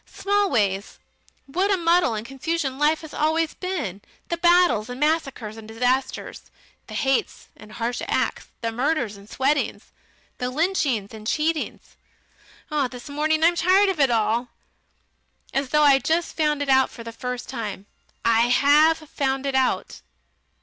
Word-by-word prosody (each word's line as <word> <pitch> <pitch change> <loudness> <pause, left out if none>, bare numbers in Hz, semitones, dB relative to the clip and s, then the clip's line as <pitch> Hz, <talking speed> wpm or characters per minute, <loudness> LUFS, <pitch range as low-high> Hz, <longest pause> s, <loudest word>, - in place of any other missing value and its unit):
Smallways, 240 - 0 0.5
what 365 +9 0
a 395 - +3
muddle 340 -7 +3
and 215 +1 -5
confusion 270 +1 -3
life 305 +2 +2
has 315 -2 -10
always 315 +1 +1
been 300 - -4 0.3
the 340 - -1
battles 345 -11 +3
and 250 +1 -6
massacres 275 -8 -1
and 220 -1 -10
disasters, 250 +4 -2 0.4
the - - -8
hates 270 -1 -1
and 215 0 -14
harsh 235 +2 -3
acts, - - -1
the 230 -1 -1
murders 250 -3 -1
and 200 +1 -15
sweatings, 280 +2 -1 0.5
the 250 - -1
lynchings 270 - 0
and 215 -1 -9
cheatings. 310 +4 -2 0.9
This 250 +2 -10
morning 310 +2 +1
I 335 - +7
am 345 - -4
tired 375 +4 +4
of 370 -5 -2
it 275 -2 +4
all, 230 +1 +1 1.1
as 275 -1 -1
though 300 +1 +3
I'd 275 -2 +5
just 330 +2 0
found 300 -2 +1
it 280 - -5
out 265 -1 +4
for 230 - -10
the 230 - -7
first 250 +1 -5
time. 210 -6 -5 0.4
I 230 +1 +4
HAVE 300 +5 +4
found 270 -1 -2
it 275 - -1
out. 265 -1 0
270 Hz, 155 wpm, -23 LUFS, 235-320 Hz, 1.1 s, I